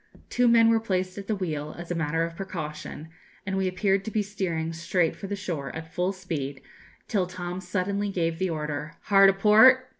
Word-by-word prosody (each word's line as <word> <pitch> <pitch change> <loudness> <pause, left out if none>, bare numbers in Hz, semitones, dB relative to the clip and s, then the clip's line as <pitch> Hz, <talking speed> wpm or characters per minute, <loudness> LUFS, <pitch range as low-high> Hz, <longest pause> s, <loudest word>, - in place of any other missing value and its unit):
Two 245 0 +3
men 230 -1 +6
were 225 0 +4
placed 185 -3 -2
at 195 - -9
the 215 - 0
wheel, 155 -6 -4
as 175 0 -7
a - - +2
matter 165 0 0
of 165 0 -4
precaution, 160 -4 -6 0.4
and 190 -1 -2
we 190 -1 +1
appeared 195 +1 +1
to 220 - -4
be 215 -1 0
steering 170 -5 -3
straight 170 0 0
for 195 - -7
the 205 - -2
shore, 170 -9 -4
at 160 0 -8
full 180 +2 0
speed, 155 -8 -4 0.5
till 190 -4 0
Tom 180 0 -5
suddenly 200 +2 -1
gave 165 -3 -1
the 190 -1 0
order 150 -1 -4
'Hard 195 -1 +6
a - - +3
port!' 220 +6 +6
185 Hz, 205 wpm, -26 LUFS, 165-200 Hz, 0.5 s, men